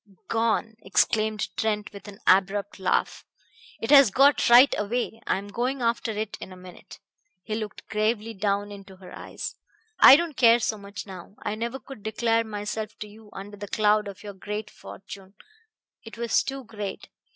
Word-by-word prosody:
"Gone!" 225 -1 0
exclaimed 215 +2 +1
Trent 210 -1 -2
with 200 +1 -11
an 200 -1 -10
abrupt 195 +2 +2
laugh. 185 - 0 0.6
"It 225 - -3
has 275 -5 +8
got 275 +7 +4
right 245 +4 +8
away! 225 +2 -3
I - - +1
am 200 +1 -8
going 250 +4 -2
after 230 0 0
it 215 -1 -4
in - - -8
a - - -10
minute." 180 0 -13 0.5
He 215 - -5
looked 215 -1 -5
gravely 215 +1 -1
down 205 0 -1
into 195 -1 -11
her 185 -1 -13
eyes. - - -7 0.4
"I 265 - +10
don't 330 -1 -1
care 235 -2 +6
so 220 -2 -2
much 200 0 -8
now. 190 0 -11
I - - -2
never 235 +4 -4
could 270 -4 -12
declare 225 +2 0
myself 215 0 -5
to 210 - -7
you 210 +1 -16
under 205 +1 -9
the 205 0 -7
cloud 210 0 +2
of 200 0 -10
your 205 -1 -7
great 210 +3 -6
fortune. 195 0 -12 0.7
It 225 0 -11
was 235 -1 +2
too 270 0 -5
great. 210 -4 -7
215 Hz, 175 wpm, -25 LUFS, 200-230 Hz, 0.7 s, I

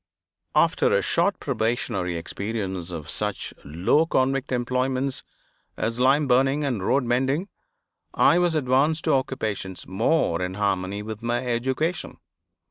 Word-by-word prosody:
After - - +3
a - - +3
short - - +1
probationary 100 -6 -1
experience 95 0 -4
of 80 -4 -6
such 105 +3 -3
low 90 - +2
convict 135 -2 +1
employments 130 +2 -1 0.6
as 115 +1 -2
lime 135 +3 +4
burning 135 +3 +3
and 125 -8 -1
road 135 +7 +2
mending, 135 - 0 0.6
I 170 - +4
was 175 -2 +2
advanced 150 +3 +2
to - - +2
occupations 110 -8 -2
more 95 - +1
in 90 +1 -3
harmony 100 0 -1
with 110 +1 -6
my 120 +2 -1
education. 130 +8 -1
120 Hz, 130 wpm, -24 LUFS, 100-135 Hz, 0.6 s, lime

